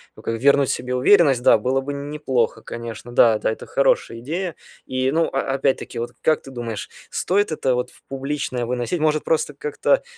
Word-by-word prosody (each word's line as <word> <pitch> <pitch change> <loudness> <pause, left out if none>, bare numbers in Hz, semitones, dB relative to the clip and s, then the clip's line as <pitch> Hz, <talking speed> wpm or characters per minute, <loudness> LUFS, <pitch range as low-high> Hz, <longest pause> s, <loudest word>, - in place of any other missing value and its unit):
ну, - - -13
как 115 0 -3
вернуть 140 +1 +4
себе 125 +1 -2
уверенность, 135 -1 +5
да, 120 - +6
было 130 +5 0
бы 140 +2 -5
неплохо, 140 -4 -1
конечно. 115 0 -7
Да 115 -2 +5
да, - - 0
это 110 - -7
хорошая - - +1
идея. 165 +7 -3 0.3
И, 130 0 0
ну, 165 +2 +2
а 135 0 -1
опять-таки, 135 -2 -1
вот 120 +1 -3
как 155 - +2
ты 135 - -11
думаешь, 115 -4 -5 0.2
стоит 200 0 +1
это 135 -4 0
вот 125 0 -1
в - - -21
публичное 135 -3 -3
выносить? 125 +7 -2
Может, 155 0 +1
просто 155 -2 0
как-то, 150 - +1
135 Hz, 190 wpm, -22 LUFS, 120-150 Hz, 0.3 s, да